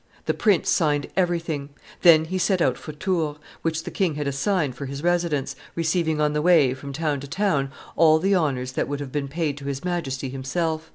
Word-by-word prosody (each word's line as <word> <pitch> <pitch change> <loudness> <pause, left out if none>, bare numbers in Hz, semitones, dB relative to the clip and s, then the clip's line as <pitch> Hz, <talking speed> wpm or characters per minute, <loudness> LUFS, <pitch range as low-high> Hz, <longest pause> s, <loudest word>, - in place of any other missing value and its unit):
The - - +1
prince 205 -7 +2
signed 145 -4 +2
everything; 165 -6 -1 0.3
then 160 -3 +7
he 185 +3 -2
set 190 0 +2
out 130 -6 +2
for 155 - -8
Tours, 155 -2 -1 0.2
which 165 0 -1
the 175 - -6
king 180 -6 0
had 145 -1 -2
assigned 145 +1 0
for 135 +3 -6
his 140 +2 -6
residence, 170 -5 0 0.2
receiving 165 -1 0
on 150 0 +2
the 150 - 0
way, 155 -6 +5
from 140 +2 -8
town 150 0 -1
to 140 - -8
town, 150 -5 0 0.2
all 160 -1 +6
the 195 +5 +1
honors 135 -8 0
that - - -1
would 145 0 -3
have 140 -2 -6
been 145 -1 -2
paid 150 0 -2
to 140 - -10
his 140 -1 -4
Majesty 140 -7 -2
himself. 160 +4 -2
155 Hz, 210 wpm, -24 LUFS, 140-170 Hz, 0.3 s, then